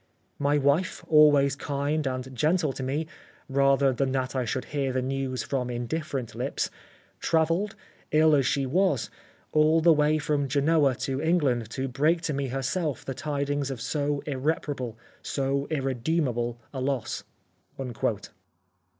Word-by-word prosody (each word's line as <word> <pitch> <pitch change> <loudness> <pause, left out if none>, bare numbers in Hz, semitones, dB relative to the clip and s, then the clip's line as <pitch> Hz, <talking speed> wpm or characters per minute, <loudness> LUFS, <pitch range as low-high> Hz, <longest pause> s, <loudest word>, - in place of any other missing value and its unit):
My 145 +1 +2
wife, 145 +6 +1
always 145 -3 +5
kind 145 +1 -1
and 130 0 -4
gentle 155 +2 +2
to - - -6
me, 140 +5 -1 0.4
rather 135 0 +3
than 130 +1 0
that 130 0 -1
I 130 -2 0
should 130 +3 -2
hear 140 -2 0
the 130 0 0
news 130 -2 -2
from 125 -3 -2
indifferent 125 +1 -3
lips, - - -2 0.5
travelled, 165 +6 +1 0.3
ill 155 0 +5
as 140 -3 +3
she 140 -1 +1
was, 150 - +1 0.4
all 155 +1 +4
the 165 +1 +6
way 150 0 +3
from 145 -2 0
Genoa 145 0 +3
to 135 0 -1
England 145 -9 +1
to 130 +3 -3
break 150 +6 +2
to 160 -2 -2
me 140 0 -1
herself 135 +4 -2
the 135 - -3
tidings 145 0 -2
of 135 -3 -4
so 145 +3 -1
irreparable, 135 -4 -2 0.2
so 140 0 -1
irredeemable, 130 -3 -1 0.2
a 130 - -4
loss." 135 -2 -2
140 Hz, 140 wpm, -27 LUFS, 130-155 Hz, 0.5 s, the